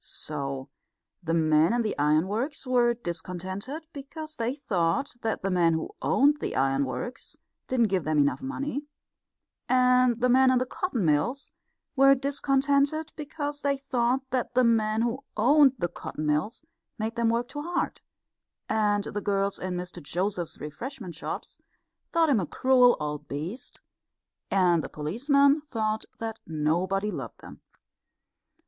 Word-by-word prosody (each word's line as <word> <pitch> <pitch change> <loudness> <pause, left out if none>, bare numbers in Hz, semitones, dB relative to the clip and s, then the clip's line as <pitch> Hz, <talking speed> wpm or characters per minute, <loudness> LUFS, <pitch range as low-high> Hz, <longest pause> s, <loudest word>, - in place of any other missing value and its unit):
So 140 -3 -5 0.5
the 165 -2 -1
men 155 +2 +4
in 240 0 +1
the 215 - -2
ironworks 190 - 0
were 240 -2 +3
discontented 185 - -5
because 310 +3 -8
they 240 +1 -2
thought 200 - 0
that 220 -3 -2
the 195 - 0
men 170 -2 +3
who 160 - -3
owned 290 +2 +3
the - - -3
ironworks 135 - -1 0.3
didn't 235 -4 +2
give 185 -3 0
them 155 0 0
enough 140 - +2
money; 280 +1 -4 0.8
and 250 -1 +4
the 250 - +3
men 260 +1 +5
in 255 - +4
the 255 - +1
cotton 255 - -2
mills 165 - 0 0.4
were 275 0 +6
discontented 280 +3 +1
because 295 -1 -5
they 280 -1 +1
thought 260 0 0
that 250 -1 -2
the 255 - +5
men 220 -1 +2
who 240 +3 -2
owned 275 +4 +6
the 175 - 0
cotton 155 -2 -6
mills 155 - -1 0.3
made 220 +1 -3
them 235 -1 +2
work 235 +1 0
too 290 - -5
hard; 350 +3 -2 0.7
and 210 -2 +1
the 205 - -4
girls 200 0 0
in 185 -1 -3
Mr 180 0 -6
Joseph's 180 +2 -2
refreshment 190 - -7
shops 165 - -6 0.5
thought 330 -1 +3
him 260 -7 +4
a 180 - -2
cruel 255 - +4
old 150 0 -4
beast; 170 - -6 0.7
and 175 -4 +3
the - - -6
policemen 280 - +2
thought 220 -7 -2
that 225 -1 -5
nobody 175 +6 0
loved - - -7
them. - - -12
230 Hz, 145 wpm, -27 LUFS, 175-270 Hz, 0.8 s, were